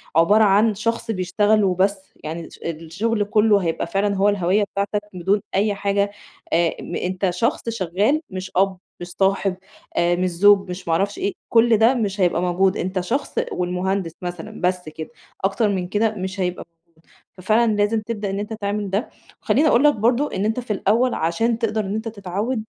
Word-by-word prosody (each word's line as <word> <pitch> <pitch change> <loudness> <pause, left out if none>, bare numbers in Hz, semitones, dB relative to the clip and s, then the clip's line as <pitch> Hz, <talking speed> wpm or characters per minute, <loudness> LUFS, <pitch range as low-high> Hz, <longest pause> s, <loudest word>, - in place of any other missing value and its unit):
عبارة 205 +7 +5
عن 210 +2 +4
شخص 230 +2 -2
بيشتغَل 205 +3 +2
وبس. 195 +1 0
يعني 160 +2 -5
الش - - -14
الشغل 175 +7 -2
كلُّه 210 0 +3
هيبقى 165 -2 -2
فعلًا 200 +3 0
هو 200 +1 +4
الهويَّة 200 +1 +2
بتاعتَك 200 +1 -1
بدون 190 +3 0
أي 205 +1 +2
حاجة، 200 0 0 0.4
آمم، 170 0 0
أنتَ 185 +1 -1
شخص 230 - -1
شغَّال 210 - 0
مش 185 0 -6
أب، 190 0 +2 0.2
مش 175 - -5
صاحب، 195 +1 0 0.4
آآ 175 0 +3
مش 180 +1 0
زوج، 195 +2 +4
مش 180 -1 -7
ما 165 - +1
أعرفش 200 +4 0
إيه. 200 - -1 0.2
كل 230 -1 +5
ده 225 +4 +5
مش 205 -4 -1
هيبقى 175 -1 +2
موجود، 185 +2 +1
أنتَ 185 +1 -2
شخص 255 +10 -3 0.2
والمهندس 180 0 -2
مثلًا 175 +4 -7
بس 180 -2 -1
كده، 155 0 -8 0.4
أكتر 205 +2 +1
من 185 -3 -2
كده 215 +2 0
مش 190 0 -5
هيبقى 180 -1 -2
موجود. 170 - -50 0.6
ففعلًا 220 +5 +2
لازِم 210 +2 +1
تبدأ 215 -2 -4
إن 195 - -3
أنتَ 210 +2 -4
تعمل 205 -1 -3
ده. 200 +6 -1 0.3
وخلِّيني 310 +2 +3
أقول 265 -1 +4
لك 295 -1 +6
برضه 240 +7 +1
إن 195 - -1
أنتَ 225 +3 0
في 235 -3 -3
الأوَّل 225 +6 +2
عشان 225 +9 0
تقدَر 215 -2 -1
إن 200 +2 -3
أنتَ 220 +1 -4
تتعوَّد، 215 +3 -3
200 Hz, 180 wpm, -21 LUFS, 180-220 Hz, 0.6 s, لك